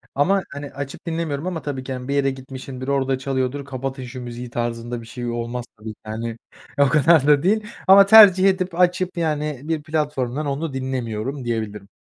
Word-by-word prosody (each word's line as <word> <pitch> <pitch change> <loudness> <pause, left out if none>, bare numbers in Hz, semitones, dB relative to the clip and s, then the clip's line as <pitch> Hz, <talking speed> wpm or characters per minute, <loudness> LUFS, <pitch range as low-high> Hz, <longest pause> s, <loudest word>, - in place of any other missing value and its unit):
Ama, 190 +8 +3
hani, 145 0 -7
açıp 140 0 -7
dinlemiyorum 160 -1 -2
ama 175 -3 -3
tabii 140 -3 -4
ki, 130 - -5
hani, 125 0 -6
bir 140 - -1
yere 140 -1 +2
gitmişimdir, 130 0 -8
orada 135 -1 +1
çalıyordur, 130 +1 -2
"Kapatın 135 0 -5
şu 125 +1 -8
müziği!" 120 0 -7
tarzında 120 0 -3
bir 115 - -13
şey 120 +1 -6
olmaz 120 +1 -4
tabii 110 +1 -8
ki, - - -30
yani. 115 +1 -5 0.4
O 140 - +6
kadar 150 +1 +4
da 145 -1 +5
değil 210 +3 +1 0.2
ama 195 +1 +9
tercih 195 -3 +8
edip 185 -2 -2
açıp, 180 0 +1
yani, 150 -4 -1
bir 155 -1 -2
platformdan 150 -3 -2
onu 140 +1 -3
dinlemiyorum 130 0 -3
diyebilirim. 105 -3 -3
135 Hz, 185 wpm, -22 LUFS, 125-155 Hz, 0.4 s, ama